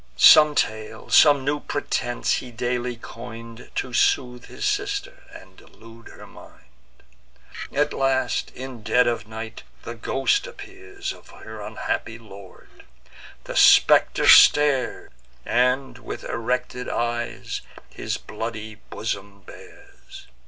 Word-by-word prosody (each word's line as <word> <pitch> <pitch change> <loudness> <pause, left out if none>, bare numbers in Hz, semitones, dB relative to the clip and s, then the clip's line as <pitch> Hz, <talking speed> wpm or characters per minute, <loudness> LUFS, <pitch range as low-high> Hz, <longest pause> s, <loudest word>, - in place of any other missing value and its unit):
Some 150 -1 +8
tale, 110 -2 -3
some 145 -3 +6
new 145 +1 0
pretence, 120 -4 -2
he 125 - -7
daily 120 +1 -3
coin'd, 115 0 -11
To 130 - -3
soothe 125 0 +1
his 415 - -6
sister, 410 +4 -2
and - - -14
delude 115 0 -16
her - - -13
mind. - - -19 0.7
At 145 +1 0
length, 135 -1 0
in 130 -3 -8
dead 110 +4 +3
of 115 -3 -2
night, 110 +1 -8 0.2
the 115 - -6
ghost 135 - 0
appears 395 -3 -8
Of - - -18
her - - -11
unhappy 320 - -4
lord: 100 -4 -15 0.6
the - - -8
spectre - - +5
stares, 145 -4 +5 0.3
And, 125 +3 0
with - - -8
erected 125 +1 -3
eyes, 120 0 -3 0.3
his - - -4
bloody 110 0 -7
bosom 100 -2 -5
bares. - - -15
125 Hz, 115 wpm, -23 LUFS, 115-145 Hz, 0.7 s, Some